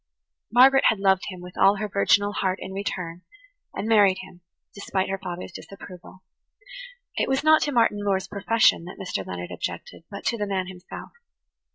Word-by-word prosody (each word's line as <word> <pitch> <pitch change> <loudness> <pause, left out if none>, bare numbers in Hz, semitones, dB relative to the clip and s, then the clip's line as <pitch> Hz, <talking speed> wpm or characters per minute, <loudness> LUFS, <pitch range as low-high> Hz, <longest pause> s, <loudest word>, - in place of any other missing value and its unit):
Margaret 265 +3 +6
had 220 - +3
loved 190 -1 +2
him 185 -3 -7
with 180 +1 -11
all 195 +1 +6
her 210 +1 -3
virginal 205 +1 +2
heart 190 -2 -1
in 190 - -7
return, 180 -3 -4 0.5
and 215 - -5
married 205 -4 +5
him, 180 -1 -15 0.3
despite 190 -2 -2
her 195 0 -3
father's 180 0 -6
disapproval. 185 0 -12 0.9
It - - 0
was 265 +2 0
not 310 0 +5
to 290 - 0
Martin 230 -5 +2
Moore's 195 -2 0
profession 205 -3 +2
that 180 - -10
Mr. 180 - -4
Leonard 90 -1 -7
objected, - - -6
but 200 -1 -9
to 235 - 0
the 205 - -1
man 190 -2 -1
himself. 180 -1 -10
195 Hz, 175 wpm, -24 LUFS, 185-210 Hz, 0.9 s, Margaret